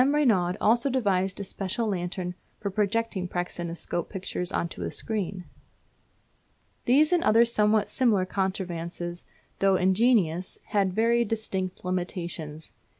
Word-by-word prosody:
Reynaud 230 Hz, -11 st, +3 dB
also 235 Hz, +5 st, +3 dB
devised 195 Hz, -7 st, +1 dB
a -, -, -2 dB
special 195 Hz, +4 st, -2 dB
lantern 180 Hz, -2 st, -2 dB, 0.3 s
for 200 Hz, -, -3 dB
projecting 210 Hz, -1 st, 0 dB
praxinoscope 175 Hz, -1 st, -3 dB
pictures 180 Hz, -2 st, -3 dB
on 170 Hz, -, 0 dB
to 90 Hz, -, -9 dB
a 85 Hz, -, -2 dB
screen. 195 Hz, -, -3 dB, 1.4 s
These 300 Hz, +7 st, +5 dB
and 350 Hz, -, +3 dB
other 230 Hz, +2 st, +6 dB
somewhat 215 Hz, -2 st, +2 dB
similar 220 Hz, -8 st, +2 dB
contrivances, 175 Hz, -2 st, -3 dB, 0.3 s
though 195 Hz, -1 st, +4 dB
ingenious, 185 Hz, -2 st, +2 dB
had 200 Hz, -2 st, +2 dB
very 235 Hz, +3 st, +3 dB
distinct 195 Hz, -5 st, -3 dB
limitations. 175 Hz, -4 st, -4 dB
190 Hz, 120 wpm, -27 LUFS, 180-225 Hz, 1.4 s, other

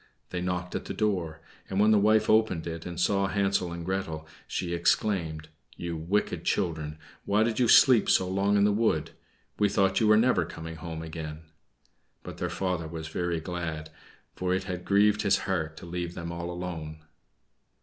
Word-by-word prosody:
They 90 Hz, -, -2 dB
knocked 90 Hz, 0 st, -3 dB
at -, -, -3 dB
the -, -, -5 dB
door, 85 Hz, -7 st, -1 dB, 0.3 s
and 95 Hz, -, -1 dB
when 105 Hz, +1 st, +5 dB
the 105 Hz, -, +5 dB
wife 110 Hz, +1 st, +4 dB
opened 110 Hz, -7 st, +3 dB
it 85 Hz, 0 st, -5 dB
and 90 Hz, 0 st, -6 dB
saw 100 Hz, +2 st, +2 dB
Hansel 95 Hz, -3 st, 0 dB
and 85 Hz, 0 st, -6 dB
Gretel, 80 Hz, -4 st, -3 dB, 0.2 s
she 85 Hz, -2 st, -3 dB
exclaimed, 85 Hz, -3 st, 0 dB, 0.3 s
"You 85 Hz, -1 st, -4 dB
wicked 85 Hz, +6 st, -1 dB
children! 80 Hz, -2 st, -1 dB, 0.3 s
why 105 Hz, +2 st, +2 dB
did 115 Hz, 0 st, -1 dB
you 125 Hz, -, +4 dB
sleep 120 Hz, -1 st, +6 dB
so 95 Hz, -, +4 dB
long 100 Hz, +2 st, +2 dB
in 100 Hz, -, +4 dB
the 105 Hz, -, +4 dB
wood? 105 Hz, -7 st, +1 dB, 0.5 s
We 105 Hz, -1 st, +4 dB
thought 95 Hz, -1 st, +2 dB
you 110 Hz, -, +3 dB
were 105 Hz, 0 st, +6 dB
never 110 Hz, -5 st, +3 dB
coming 80 Hz, 0 st, -8 dB
home 80 Hz, -1 st, -6 dB
again." 80 Hz, -1 st, -7 dB, 0.8 s
But -, -, -9 dB
their -, -, -1 dB
father 90 Hz, -4 st, -2 dB
was 80 Hz, -1 st, -6 dB
very 85 Hz, -1 st, -1 dB
glad, 80 Hz, -2 st, -5 dB, 0.4 s
for 90 Hz, 0 st, 0 dB
it 95 Hz, -, -2 dB
had 90 Hz, -2 st, -5 dB
grieved 105 Hz, +1 st, +4 dB
his 100 Hz, -, +3 dB
heart 80 Hz, -5 st, -2 dB
to -, -, -9 dB
leave 85 Hz, 0 st, -4 dB
them 85 Hz, 0 st, -5 dB
all 85 Hz, 0 st, -5 dB
alone. 80 Hz, -3 st, -6 dB
90 Hz, 185 wpm, -28 LUFS, 80-100 Hz, 0.8 s, sleep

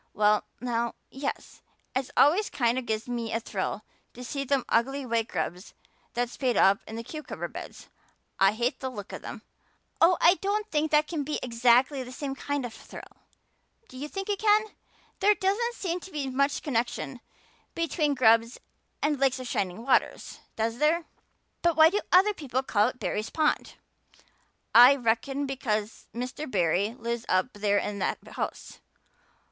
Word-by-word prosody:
"Well 210 Hz, 0 st, +3 dB
now, 235 Hz, 0 st, -2 dB, 0.2 s
yes. 275 Hz, +1 st, -5 dB, 0.3 s
It 260 Hz, 0 st, -1 dB
always 355 Hz, +9 st, +5 dB
kind 240 Hz, 0 st, +1 dB
of 255 Hz, -, -9 dB
gives 220 Hz, +2 st, -2 dB
me 235 Hz, -2 st, -3 dB
a 225 Hz, -, 0 dB
thrill 210 Hz, -1 st, -4 dB, 0.3 s
to 250 Hz, -, -8 dB
see 275 Hz, +3 st, -3 dB
them 275 Hz, -1 st, 0 dB
ugly 270 Hz, +4 st, +1 dB
white 230 Hz, -2 st, 0 dB
grubs 180 Hz, +2 st, -4 dB, 0.4 s
that 245 Hz, +1 st, +1 dB
spade 245 Hz, -1 st, -1 dB
up 195 Hz, +1 st, +5 dB
in 220 Hz, -, -7 dB
the 230 Hz, -, -5 dB
cucumber 305 Hz, +5 st, -6 dB
beds. -, -, -10 dB, 0.5 s
I 195 Hz, +1 st, +5 dB
hate 240 Hz, +3 st, -1 dB
the 260 Hz, -, -3 dB
look 210 Hz, -6 st, -8 dB
of -, -, -6 dB
them." -, -, -8 dB, 0.6 s
"Oh, 345 Hz, +1 st, +6 dB
I 355 Hz, +3 st, +5 dB
don't 415 Hz, +2 st, -1 dB
think 310 Hz, 0 st, +1 dB
that 300 Hz, 0 st, +3 dB
can 310 Hz, -3 st, -2 dB
be 300 Hz, +2 st, -2 dB
exactly 250 Hz, +3 st, +3 dB
the 250 Hz, 0 st, -8 dB
same 270 Hz, +1 st, -4 dB
kind 280 Hz, 0 st, -3 dB
of 235 Hz, -, -7 dB
a -, -, -13 dB
thrill. -, -, -12 dB, 0.7 s
Do -, -, -14 dB
you 280 Hz, +3 st, -5 dB
think 390 Hz, +5 st, -5 dB
it 405 Hz, -1 st, -1 dB
can? 430 Hz, 0 st, +3 dB, 0.5 s
There 415 Hz, +2 st, +4 dB
doesn't 425 Hz, +5 st, 0 dB
seem 360 Hz, -4 st, -2 dB
to 385 Hz, -, -11 dB
be 280 Hz, -4 st, -3 dB
much 280 Hz, +2 st, 0 dB
connection 250 Hz, -1 st, -2 dB, 0.6 s
between 310 Hz, -3 st, 0 dB
grubs 230 Hz, -1 st, +4 dB, 0.4 s
and 295 Hz, -1 st, +1 dB
lakes 270 Hz, -1 st, +2 dB
of 255 Hz, -, -6 dB
shining 195 Hz, 0 st, -2 dB
waters, 270 Hz, -, +1 dB, 0.2 s
does 225 Hz, +2 st, -2 dB
there? 320 Hz, +3 st, +2 dB, 0.6 s
But 340 Hz, -1 st, +2 dB
why 320 Hz, +1 st, +8 dB
do 415 Hz, -, 0 dB
other 385 Hz, +4 st, +6 dB
people 265 Hz, -, -3 dB
call 210 Hz, -4 st, +2 dB
it 255 Hz, -, -5 dB
Barry's 210 Hz, +1 st, -2 dB
pond?" 310 Hz, -1 st, 0 dB, 1.0 s
"I 245 Hz, +4 st, +9 dB
reckon 265 Hz, +3 st, 0 dB
because 225 Hz, -6 st, -3 dB
Mr. 250 Hz, +6 st, -5 dB
Barry 195 Hz, +2 st, +1 dB
lives 235 Hz, -1 st, -3 dB
up 185 Hz, +7 st, +1 dB
there 205 Hz, 0 st, +1 dB
in 205 Hz, 0 st, -2 dB
that -, -, 0 dB
house. -, -, -5 dB
255 Hz, 175 wpm, -27 LUFS, 230-300 Hz, 1.0 s, I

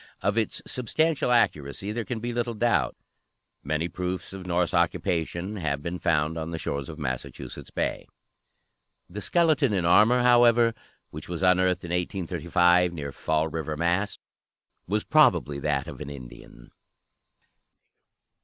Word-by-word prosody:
Of 100 Hz, +2 st, +1 dB
its 115 Hz, -2 st, -1 dB
substantial 150 Hz, +3 st, 0 dB
accuracy 95 Hz, -, +1 dB
there 115 Hz, 0 st, -3 dB
can 120 Hz, -3 st, -4 dB
be 120 Hz, +2 st, -4 dB
little 120 Hz, -1 st, -2 dB
doubt. 120 Hz, +2 st, +1 dB, 0.7 s
Many 80 Hz, +4 st, -1 dB
proofs 90 Hz, +1 st, -4 dB
of 95 Hz, -1 st, -8 dB
Norse 90 Hz, -1 st, 0 dB
occupation 85 Hz, +4 st, -1 dB
have 75 Hz, -5 st, -2 dB
been 85 Hz, +2 st, -4 dB
found 80 Hz, 0 st, +1 dB
on 80 Hz, 0 st, -4 dB
the 85 Hz, -, -4 dB
shores 70 Hz, -2 st, -4 dB
of 80 Hz, -, -8 dB
Massachusetts 65 Hz, -5 st, -6 dB
Bay. -, -, -3 dB, 1.0 s
The 100 Hz, +5 st, -7 dB
"skeleton 155 Hz, -, +2 dB
in 90 Hz, -4 st, 0 dB
armor," 115 Hz, +8 st, +5 dB
however, 120 Hz, -1 st, +5 dB, 0.4 s
which -, -, -9 dB
was 90 Hz, +1 st, -4 dB
unearthed 90 Hz, 0 st, +3 dB
in 85 Hz, -, -6 dB
1835 90 Hz, 0 st, +1 dB
near 70 Hz, -4 st, -5 dB
Fall 80 Hz, +3 st, 0 dB
River, 80 Hz, -1 st, -4 dB
Mass., 90 Hz, +5 st, 0 dB, 0.7 s
was 105 Hz, +3 st, 0 dB
probably 85 Hz, -, +3 dB
that 70 Hz, -1 st, -1 dB
of -, -, -9 dB
an -, -, -6 dB
Indian. -, -, -12 dB
90 Hz, 140 wpm, -26 LUFS, 80-110 Hz, 1.0 s, armor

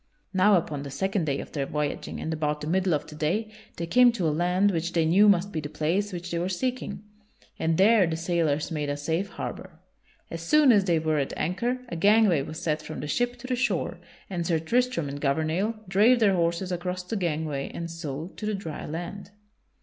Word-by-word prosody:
Now 195 Hz, +2 st, +5 dB
upon 155 Hz, -5 st, -1 dB
the 140 Hz, -, -6 dB
second 190 Hz, +6 st, -1 dB
day 140 Hz, -2 st, -1 dB
of -, -, -11 dB
their 140 Hz, -2 st, -2 dB
voyaging 150 Hz, -1 st, -3 dB
and 160 Hz, -, -3 dB
about 150 Hz, -1 st, -1 dB
the -, -, -4 dB
middle 180 Hz, +1 st, +2 dB
of 145 Hz, -, -3 dB
the -, -, -11 dB
day 180 Hz, +9 st, -1 dB, 0.3 s
they 170 Hz, -, -2 dB
came 245 Hz, +8 st, +5 dB
to 185 Hz, -8 st, -1 dB
a 150 Hz, -, +1 dB
land 180 Hz, +5 st, +2 dB
which 170 Hz, 0 st, -2 dB
they 165 Hz, -2 st, +2 dB
knew 195 Hz, +6 st, +5 dB
must 195 Hz, +1 st, +3 dB
be 160 Hz, -, -2 dB
the 145 Hz, -1 st, -5 dB
place 165 Hz, +7 st, -1 dB
which 175 Hz, -1 st, -6 dB
they 170 Hz, -, -1 dB
were 180 Hz, +2 st, -1 dB
seeking, 205 Hz, -1 st, -3 dB, 0.6 s
and 160 Hz, 0 st, +1 dB
there 205 Hz, -1 st, +5 dB
the 160 Hz, -1 st, -2 dB
sailors 165 Hz, -3 st, 0 dB
made 150 Hz, -2 st, -2 dB
a 145 Hz, -, -2 dB
safe 165 Hz, +7 st, -1 dB
harbor. 185 Hz, -5 st, -7 dB, 0.5 s
As 165 Hz, -, -5 dB
soon 290 Hz, -, +5 dB
as 205 Hz, -4 st, +4 dB
they 170 Hz, -3 st, +2 dB
were 155 Hz, -1 st, +1 dB
at 135 Hz, -, -3 dB
anchor 240 Hz, +9 st, -1 dB
a -, -, -4 dB
gangway 200 Hz, -2 st, +4 dB
was 155 Hz, +3 st, -6 dB
set 155 Hz, -3 st, -1 dB
from 155 Hz, -, -7 dB
the 150 Hz, -, -5 dB
ship 245 Hz, +10 st, 0 dB
to -, -, -9 dB
the 255 Hz, 0 st, -1 dB
shore 220 Hz, -9 st, -1 dB, 0.3 s
and 175 Hz, -3 st, -3 dB
Sir 165 Hz, -, +2 dB
Tristram 230 Hz, -, 0 dB
and 140 Hz, +1 st, -6 dB
Gouvernail 160 Hz, +9 st, 0 dB
drave 215 Hz, +7 st, +4 dB
their 205 Hz, -4 st, +4 dB
horses 170 Hz, +1 st, 0 dB
across 180 Hz, +1 st, -3 dB
the 180 Hz, +5 st, -4 dB
gangway 155 Hz, -6 st, -2 dB
and 170 Hz, -1 st, -5 dB
so 160 Hz, -1 st, -5 dB
to 210 Hz, -, -4 dB
the 215 Hz, -, 0 dB
dry 165 Hz, -6 st, -6 dB
land. 175 Hz, +5 st, -6 dB
170 Hz, 220 wpm, -26 LUFS, 155-200 Hz, 0.6 s, Now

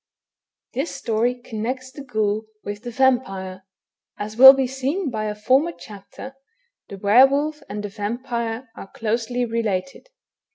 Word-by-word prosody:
This -, -, -3 dB
story 235 Hz, +2 st, 0 dB
connects 250 Hz, +2 st, -5 dB
the 285 Hz, -, -10 dB
ghoul 215 Hz, -3 st, -1 dB, 0.2 s
with 205 Hz, 0 st, -6 dB
the 240 Hz, -, -6 dB
vampire. 195 Hz, -7 st, 0 dB, 0.5 s
As 215 Hz, +1 st, -6 dB
will 265 Hz, +3 st, +11 dB
be 270 Hz, -1 st, 0 dB
seen 270 Hz, +6 st, -2 dB
by 215 Hz, -2 st, -3 dB
a 210 Hz, 0 st, -3 dB
former 260 Hz, +10 st, +2 dB
chapter, 210 Hz, +6 st, -11 dB, 0.5 s
the 200 Hz, -, -8 dB
were 210 Hz, +7 st, +6 dB
wolf 300 Hz, +2 st, -1 dB
and 205 Hz, +1 st, -5 dB
the 205 Hz, -, -4 dB
vampire 235 Hz, +3 st, -4 dB
are 195 Hz, -, -10 dB
closely 230 Hz, +2 st, -1 dB
related. 230 Hz, -, -3 dB
235 Hz, 140 wpm, -22 LUFS, 210-265 Hz, 0.5 s, will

